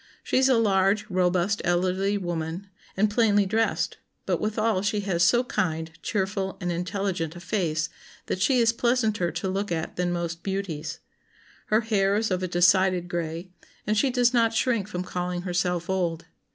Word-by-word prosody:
She -, -, +1 dB
is 265 Hz, 0 st, +4 dB
a 255 Hz, -, +4 dB
large, 205 Hz, -1 st, +2 dB
robust, 185 Hz, +2 st, +1 dB
elderly 185 Hz, +3 st, +1 dB
woman, 175 Hz, 0 st, -4 dB, 0.3 s
and 210 Hz, +2 st, +4 dB
plainly 210 Hz, -2 st, +3 dB
dressed; 225 Hz, +3 st, 0 dB, 0.3 s
but -, -, 0 dB
withal 215 Hz, -2 st, 0 dB
she 205 Hz, +1 st, 0 dB
has 190 Hz, -4 st, -1 dB
so 240 Hz, +8 st, +4 dB
kind, 160 Hz, -, -2 dB
cheerful, 195 Hz, -1 st, -2 dB
and 180 Hz, -1 st, -2 dB
intelligent 180 Hz, -2 st, -2 dB
a -, -, -8 dB
face, 165 Hz, -5 st, -1 dB, 0.4 s
that 185 Hz, -, -3 dB
she 260 Hz, +5 st, +3 dB
is 230 Hz, -1 st, +4 dB
pleasanter 225 Hz, -7 st, +1 dB
to -, -, -3 dB
look 195 Hz, +1 st, -2 dB
at 160 Hz, -1 st, -3 dB
than 180 Hz, 0 st, 0 dB
most 170 Hz, -1 st, -3 dB
beauties. 190 Hz, -6 st, -4 dB, 0.7 s
Her 215 Hz, +2 st, +3 dB
hair 200 Hz, -3 st, +1 dB
is 215 Hz, 0 st, 0 dB
of 185 Hz, 0 st, 0 dB
a 185 Hz, -, -1 dB
decided 180 Hz, 0 st, +3 dB
gray, 170 Hz, +1 st, -4 dB, 0.3 s
and 215 Hz, -, +1 dB
she 270 Hz, +6 st, +3 dB
does 245 Hz, -1 st, +2 dB
not 230 Hz, -2 st, +3 dB
shrink 225 Hz, -4 st, +1 dB
from 180 Hz, -3 st, -4 dB
calling 180 Hz, -1 st, -3 dB
herself 180 Hz, -1 st, -1 dB
old. 175 Hz, -3 st, -1 dB
190 Hz, 170 wpm, -26 LUFS, 175-215 Hz, 0.7 s, is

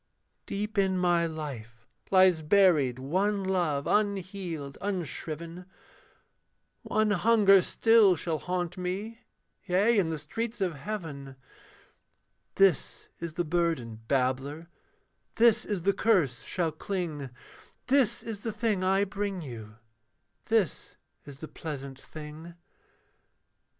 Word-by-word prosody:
Deep 210 Hz, +1 st, -2 dB
in 190 Hz, -1 st, +2 dB
my 175 Hz, -2 st, +2 dB
life 120 Hz, -8 st, -7 dB, 0.2 s
lies 185 Hz, -3 st, +5 dB
buried 155 Hz, -7 st, +4 dB
one 190 Hz, +9 st, 0 dB
love 175 Hz, -7 st, 0 dB
unhealed, 185 Hz, -8 st, -2 dB
unshriven, 170 Hz, -2 st, -4 dB, 1.1 s
One 215 Hz, -1 st, +1 dB
hunger 205 Hz, -1 st, +5 dB
still 225 Hz, -2 st, +4 dB
shall 160 Hz, -1 st, -2 dB
haunt 180 Hz, +1 st, -3 dB
me 200 Hz, +6 st, -4 dB, 0.4 s
yea, 205 Hz, +4 st, +3 dB
in 170 Hz, -4 st, +1 dB
the 160 Hz, -, -2 dB
streets 225 Hz, +10 st, -4 dB
of 185 Hz, -3 st, 0 dB
heaven; 145 Hz, -5 st, -6 dB, 1.2 s
This 195 Hz, -6 st, +2 dB
is 170 Hz, -1 st, -5 dB
the 175 Hz, -, -1 dB
burden, 155 Hz, -10 st, -1 dB
babbler, 135 Hz, +5 st, -1 dB, 0.7 s
this 230 Hz, -1 st, +4 dB
is 200 Hz, -5 st, -3 dB
the 200 Hz, +2 st, +3 dB
curse 185 Hz, -, +2 dB
shall 170 Hz, -3 st, -2 dB
cling, 155 Hz, -4 st, -4 dB, 0.6 s
This 250 Hz, -3 st, +2 dB
is 220 Hz, -3 st, -6 dB
the 225 Hz, -, -3 dB
thing 215 Hz, -3 st, -1 dB
I 195 Hz, +1 st, +3 dB
bring 200 Hz, -2 st, -3 dB
you; 110 Hz, -5 st, -9 dB, 0.7 s
this 220 Hz, -7 st, 0 dB, 0.3 s
is 140 Hz, -1 st, -11 dB
the 160 Hz, -, -6 dB
pleasant 140 Hz, -5 st, -7 dB
thing. 155 Hz, +2 st, -10 dB
180 Hz, 115 wpm, -28 LUFS, 150-200 Hz, 1.2 s, lies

